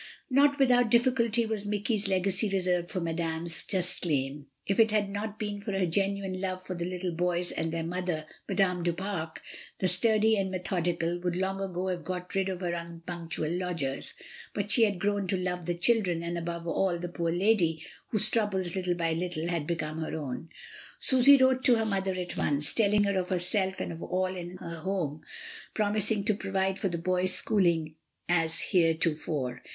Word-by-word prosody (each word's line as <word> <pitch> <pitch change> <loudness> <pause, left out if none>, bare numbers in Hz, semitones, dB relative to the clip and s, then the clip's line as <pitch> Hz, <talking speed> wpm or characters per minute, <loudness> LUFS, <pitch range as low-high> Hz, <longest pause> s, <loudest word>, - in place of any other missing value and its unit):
Not 285 +2 +4
without 245 -3 +4
difficulty 235 -1 +2
was 215 -2 -3
Mike/s 205 0 -1
legacy 190 +2 +1
re 195 0 0
served 180 -1 0
for 185 - -3
Madame's 165 -1 -1
just 180 -2 +2
claim. 140 -3 -2 0.2
If 195 - -1
it 225 0 +6
had 210 -2 0
not 210 +1 -4
been 205 -1 -4
for 205 -1 -4
her 195 -1 +1
genuine 195 +1 -1
love 185 -1 -4
for 185 - -5
the 170 0 -3
little 180 0 -3
boys 175 +1 0
and 160 0 -3
their 165 0 -3
mother, 175 -2 -3 0.2
Madame 190 -2 +1
du 170 0 0
Pare, 175 -3 -4 0.5
the 185 - 0
sturdy 220 +4 +3
and 195 -1 -1
methodical, 175 -2 -2
would 175 -1 -2
long 190 +1 -2
ago 185 -1 -3
have 175 -3 -3
got 180 +2 -5
rid 195 0 0
of 185 -1 -5
her 175 -2 -1
unpunctual 170 -2 -5
lodgers, 170 -7 -2 0.4
but 205 0 -2
she 230 - +5
had 200 -3 -1
grown 200 0 -1
to 190 - 0
love 180 -2 -3
the 175 - 0
children, 180 -4 +2
and, 170 0 -3
above 170 0 -5
all, 175 +1 0
the 175 +1 -5
poor 170 -1 -2
lady, 175 -3 +1 0.2
whose 215 -3 +4
troubles, 195 -6 0
little 180 -2 -1
by 165 -1 0
little, 170 -1 -3
had 165 -4 -2
become 160 -2 -3
her 160 0 -4
own. 150 +2 -6 0.5
Susy 265 +2 +7
wrote 260 0 +3
to 245 - +5
her 225 -1 0
mother 195 -3 -1
at 180 -2 -4
once, 145 0 +3
telling 210 -2 +3
her 200 -1 +1
of 180 - -4
herself 190 +1 +1
and - - -3
of 165 0 -8
all 185 0 -1
in 175 0 -7
her 170 -1 -7
home, 160 -5 -3 0.5
promising 210 0 +2
to 215 - +2
provide 195 -1 -2
for 195 - 0
the 170 - -3
boys' 185 +2 +3
schooling 170 -6 +2 0.3
as 165 -1 +2
heretofore. 160 -6 0
185 Hz, 190 wpm, -28 LUFS, 170-200 Hz, 0.5 s, Susy